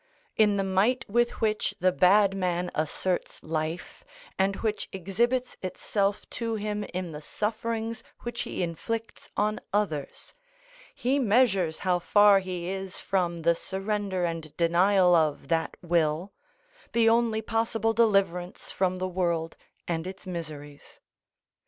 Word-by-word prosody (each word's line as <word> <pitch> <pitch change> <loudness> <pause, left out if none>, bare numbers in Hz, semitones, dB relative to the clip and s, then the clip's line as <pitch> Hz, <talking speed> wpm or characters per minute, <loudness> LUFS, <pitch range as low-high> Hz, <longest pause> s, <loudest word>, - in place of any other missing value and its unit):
In 210 -2 +4
the 195 - +1
might 195 +7 +1
with 240 +4 +1
which 215 -1 0
the 185 0 +3
bad 195 +5 +4
man 180 -2 -1
asserts 175 +4 -2
life, 155 +2 -4 0.4
and 195 +1 +2
which 215 0 -2
exhibits 235 +7 -1
itself 200 +2 -1
to 230 -1 -2
him 210 0 -2
in 180 -1 -5
the 150 -1 -7
sufferings 225 +5 -3 0.2
which 240 0 -4
he - - -3
inflicts 225 +7 -4
on 215 +1 +1
others, 175 -9 -2 0.6
he 265 +3 +1
measures 200 - +3
how 180 -1 +3
far 205 +2 +6
he 180 -2 -5
is 190 0 -4
from 175 -3 -1
the 170 +1 +5
surrender 195 +1 -2
and 165 -3 -5
denial 180 +2 +4
of 155 -4 +2
that 165 -1 0
will, 170 +1 +1 0.6
the 230 -1 +4
only 225 -1 +3
possible 225 0 0
deliverance 195 -6 +1
from 185 -1 0
the 185 0 -2
world 170 -3 -1 0.3
and 165 0 -2
its 190 +1 -8
miseries. 150 -5 -8
190 Hz, 135 wpm, -27 LUFS, 170-215 Hz, 0.6 s, far